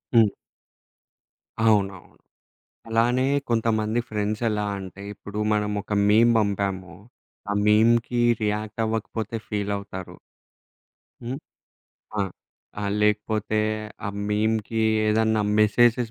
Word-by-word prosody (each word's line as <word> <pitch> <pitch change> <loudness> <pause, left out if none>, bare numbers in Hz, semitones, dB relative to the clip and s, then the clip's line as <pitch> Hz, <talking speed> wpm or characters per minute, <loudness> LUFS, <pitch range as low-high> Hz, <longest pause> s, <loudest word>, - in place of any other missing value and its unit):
హ్మ్. 110 -2 +7 1.4
అవునవును. 100 -4 +1 0.7
అలానే 120 +3 +2 0.2
కొంతమంది 115 -1 +1
ఫ్రెండ్సెలా 105 0 -1
అంటే. 95 0 -9
ఇప్పుడు 105 +1 -8
మనం 105 0 0
ఒక 105 - -8 0.2
మీమ్ 115 +3 +5
బంపాము. 100 -3 -1 0.6
ఆ - - +1
మీమ్‌కి 115 +3 +4 0.2
రియాక్టవ్వకపోతే 110 +1 -2
ఫీలవుతారు. 100 -3 -4 1.1
హ్మ్. 130 +4 -4 0.8
ఆ! 100 - +3 0.6
ఆహ్, 100 -1 -1
లేకపోతే 105 0 +1 0.5
ఆ - - -1 0.2
మీమ్‌కి 110 +1 0 0.2
ఏదన్నా 110 0 +2 0.2
మెసేజెస్ 115 +2 +3
105 Hz, 85 wpm, -24 LUFS, 105-115 Hz, 1.4 s, హ్మ్